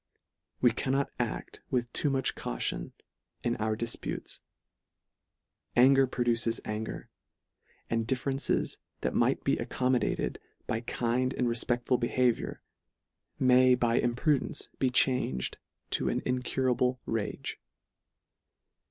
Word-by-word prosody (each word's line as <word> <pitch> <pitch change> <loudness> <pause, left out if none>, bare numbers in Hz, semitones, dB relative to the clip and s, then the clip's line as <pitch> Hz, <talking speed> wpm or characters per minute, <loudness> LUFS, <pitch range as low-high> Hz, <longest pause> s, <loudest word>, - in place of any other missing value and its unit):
We 125 - +6
cannot 135 +3 0
a£t - - -3
with 120 -2 -1
too 145 - +1
much 135 -2 +1
caution - - -3 0.5
in 120 0 +1
our 110 0 0
difputes. 115 0 -4 1.3
Anger 135 +2 +6
produces 120 -2 0
anger; 110 +1 -4 0.8
and 115 -1 -1
differences 135 +2 0 0.2
that - - -1
might - - +2
be - - +2
accommodated 125 -1 0 0.3
by 110 - -1
kind 125 +2 0
and 125 - +1
refpeclful 120 +1 +1
behaviour, 120 0 0 0.7
may 130 0 +6
by 120 -1 +2
imprudence 125 +4 0
be 130 - +3
changed 125 - +1 0.3
to - - +1
an - - -1
incurable 125 0 +1
rage. 115 -2 -3
125 Hz, 105 wpm, -30 LUFS, 115-130 Hz, 1.3 s, We